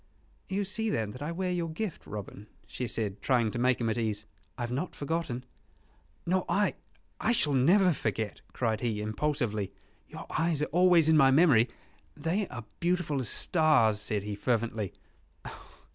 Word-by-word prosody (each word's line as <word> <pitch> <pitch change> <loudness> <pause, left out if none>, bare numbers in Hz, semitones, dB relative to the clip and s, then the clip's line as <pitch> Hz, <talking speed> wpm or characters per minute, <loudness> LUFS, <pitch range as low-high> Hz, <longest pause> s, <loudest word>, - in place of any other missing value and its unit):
"You 195 +1 -1
see 220 +3 -1
then 110 - -1
that 125 - -10
I 150 +3 -3
wear 180 +2 -2
your 170 -2 -1
gift, 175 +3 -5
Robin," 105 0 -7 0.2
she 125 - -5
said, 105 -4 -3
trying 120 -5 +2
to 120 - -4
make 125 0 +2
him 115 - -1
at 115 +2 0
ease. 110 -2 -2 0.3
"I - - -3
have 120 - -3
not 140 +8 -3
forgotten 145 -5 -3 0.4
" 75 0 -36
"Nor 185 +1 +1
I 205 +1 +2 0.5
I 230 - +2
shall 150 -10 +2
never 175 +8 +5
forget," 110 -5 -3
cried 110 -3 -1
he, 115 -4 -1
impulsively. 110 -2 -1 0.4
"Your - - -8
eyes 160 -2 +1
are 150 - -4
always 175 -2 +5
in 160 -1 +5
my 135 -3 +6
memory: 135 -5 +5 0.5
they 180 +6 -1
are 120 -3 -8
beautiful 175 -5 0
as 125 - -1
stars," 140 - +3
said 105 -1 -2
he, 105 0 -4
fervently. 115 -2 -1
130 Hz, 175 wpm, -29 LUFS, 110-170 Hz, 0.5 s, my